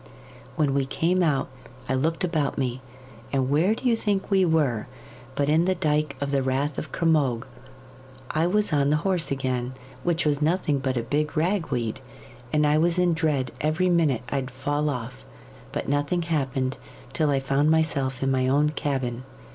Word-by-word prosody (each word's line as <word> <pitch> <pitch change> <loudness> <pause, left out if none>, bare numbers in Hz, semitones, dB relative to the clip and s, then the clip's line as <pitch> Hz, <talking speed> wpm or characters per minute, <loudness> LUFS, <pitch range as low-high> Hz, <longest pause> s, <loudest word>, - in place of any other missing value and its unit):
When 145 -3 +1
we 135 -1 +1
came 175 +6 +1
out 150 -6 +1 0.4
I - - 0
looked 160 +7 0
about 160 -5 0
me, 130 -1 -2 0.5
and 135 -1 0
where 175 +9 +3
do 255 - -3
you 235 - +4
think 205 -3 -1
we 190 -1 +4
were 150 -10 +1 0.5
but 140 - +1
in 160 +3 +3
the 185 0 +2
dyke 150 -4 0
of 140 0 -2
the 140 -1 +2
Rath 135 +2 -1
of 145 - -7
Cromogue. 145 -8 +1 0.9
I 160 +2 +1
was 205 -1 +1
on 140 -1 +3
the 150 - +3
horse 185 -4 +1
again, 130 -2 -2 0.3
which 170 -2 0
was 145 -1 +1
nothing 155 -2 +1
but 130 -1 -1
a 120 - 0
big 150 +4 -1
rag 175 +2 +1
weed, 115 -3 -2 0.5
and 150 0 +3
I 150 +1 +3
was 170 +2 +2
in 180 -1 +3
dread 150 -6 0
every 155 +5 +1
minute 155 -9 +2
I'd 135 -2 -2
fall 145 +4 -1
off; 115 - -5 0.5
but - - -3
nothing 145 +5 0
happened 135 -5 -1 0.4
till 155 -3 +1
I 140 -1 +2
found 135 +3 +1
myself 140 -5 +1
in 135 - +1
my 130 -1 +1
own 145 +3 +3
cabin. 130 -5 -2
145 Hz, 180 wpm, -25 LUFS, 135-165 Hz, 0.9 s, you